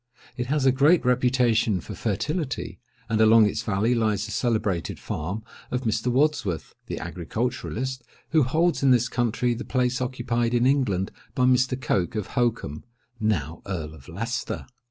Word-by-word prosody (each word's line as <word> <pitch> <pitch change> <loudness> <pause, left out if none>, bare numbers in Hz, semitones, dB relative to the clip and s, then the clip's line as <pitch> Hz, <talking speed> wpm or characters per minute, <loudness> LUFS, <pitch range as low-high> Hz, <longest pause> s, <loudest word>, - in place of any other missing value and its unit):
It 120 0 -3
has 145 0 +1
a 130 - +6
great 145 +5 +4
reputation 125 -5 +3
for - - -8
fertility; 135 - -2 0.3
and 110 -1 +1
along 110 0 +7
its 105 - -1
valley 105 +3 +1
lies 110 -3 +1
the 110 - -7
celebrated 110 -7 -1
farm 95 +8 -4 0.3
of 125 - -1
Mr. 110 +1 0
Wadsworth, 135 - 0
the - - -4
agriculturist, 115 +8 -3 0.3
who 155 - +5
holds 165 +7 +2
in 135 - +4
this 125 -1 +4
country 120 0 0
the 120 +3 -5
place 125 -1 0
occupied 120 -2 -1
in 120 +1 +3
England 125 -9 +1 0.2
by 130 - +2
Mr. 130 0 +3
Coke 95 -7 0
of 105 -3 -3
Holkham—now 110 - -2
Earl 80 -5 -4
of 70 -4 -15
Leicester. 115 +8 -3
120 Hz, 155 wpm, -25 LUFS, 105-130 Hz, 0.3 s, along